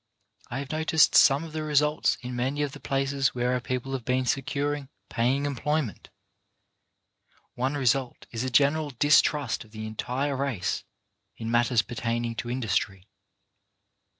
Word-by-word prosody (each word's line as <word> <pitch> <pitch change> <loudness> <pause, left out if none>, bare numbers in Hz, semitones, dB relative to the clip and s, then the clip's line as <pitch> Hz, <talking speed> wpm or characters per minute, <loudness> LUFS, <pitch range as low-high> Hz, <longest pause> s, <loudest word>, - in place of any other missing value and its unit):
I 120 - -4
have 140 0 -5
noticed 160 0 +3
some 140 +2 +6
of 160 -2 -9
the 155 - -3
results 150 0 +2
in 125 0 -5
many 135 +4 -1
of 145 - -2
the 145 - -10
places 135 -1 0
where 125 0 +1
our 125 - +1
people 130 +2 -3
have 130 -3 -3
been 130 +2 0
securing 140 +2 -1 0.2
paying 130 +5 +1
employment. 145 - -2 1.4
One 130 +4 -1
result 135 -2 0
is 115 +1 -3
a 130 - -1
general 145 +4 +3
distrust 145 -2 +3
of 110 - -19
the 110 0 -7
entire 125 +6 -2
race 130 -9 -2 0.5
in 115 0 -4
matters 120 -1 +3
per 120 - -9
taining 115 0 -2
to 120 - -4
industry. 100 -5 -2
130 Hz, 150 wpm, -27 LUFS, 120-145 Hz, 1.4 s, some